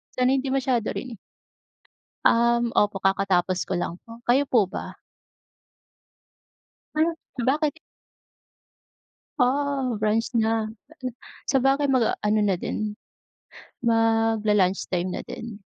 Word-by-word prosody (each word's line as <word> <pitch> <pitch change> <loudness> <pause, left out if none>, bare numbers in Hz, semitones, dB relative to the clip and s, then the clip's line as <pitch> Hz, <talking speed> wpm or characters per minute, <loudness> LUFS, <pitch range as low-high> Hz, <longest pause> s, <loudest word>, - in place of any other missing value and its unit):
Sana 255 +1 +3
hindi 270 0 0
masyado 255 -4 +1
rin. 245 -5 -6 1.1
Um, 235 0 +2
opo, 205 -1 +2
kakatapos 190 -1 +1
ko 190 - -4
lang 170 - -3
po, 230 0 -12
kayo 260 +4 +4
po 235 -8 +2
ba? - - -7 2.0
Ano, 320 +2 +2 0.3
bakit? 300 +3 +1 1.6
Ah, 275 +1 +1
brunch 215 +3 0
na, 225 -1 +2 0.9
sabagay 270 +2 +3
mag-aano 215 -4 +2
na 200 -2 +2
din, 210 +3 -3 0.9
magla-lunchtime 215 -5 +2
na - - -4
din. 225 -3 -8
225 Hz, 95 wpm, -25 LUFS, 210-260 Hz, 2.0 s, kayo